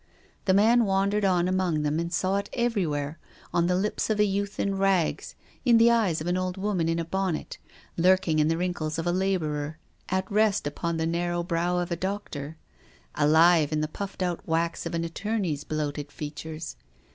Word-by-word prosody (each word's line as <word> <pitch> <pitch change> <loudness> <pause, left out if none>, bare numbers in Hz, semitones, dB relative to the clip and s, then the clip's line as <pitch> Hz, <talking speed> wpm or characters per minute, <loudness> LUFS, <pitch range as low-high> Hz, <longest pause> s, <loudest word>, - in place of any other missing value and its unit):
The 190 -1 +4
man 230 +4 +5
wandered 200 +1 +1
on 180 -2 +3
among 185 -5 0
them 150 +2 0
and 170 0 -3
saw 185 +3 +1
it 200 0 -3
everywhere, 165 -11 -1 0.3
on 170 0 +2
the 180 - +2
lips 205 +4 -1
of 215 -1 0
a - - +6
youth 200 0 -2
in 195 -1 0
rags, 195 -4 +1 0.3
in 240 -3 +5
the 230 +1 +6
eyes 210 -9 +2
of 155 - -5
an 175 +1 0
old 185 0 -2
woman 190 -4 0
in 165 - 0
a 165 - -2
bonnet, 190 -1 -2 0.4
lurking 180 -2 +3
in 150 - +3
the 165 +1 +1
wrinkles 170 -3 -2
of 165 - -2
a 175 - +2
labourer, 160 -5 -1 0.3
at 190 +1 0
rest 210 -3 +2
upon 165 +3 -2
the 160 - 0
narrow 175 +1 -1
brow 175 0 0
of 175 -1 -2
a - - +1
doctor, 170 -5 -5 0.6
alive 160 +1 +4
in 155 0 0
the 155 - 0
puffed 195 +4 -5
out 175 -2 -2
wax 165 +1 -1
of - - -4
an 165 - -1
attorney's 175 -3 -2
bloated 145 -1 -3
features. 155 +1 -6
175 Hz, 190 wpm, -27 LUFS, 160-195 Hz, 0.6 s, a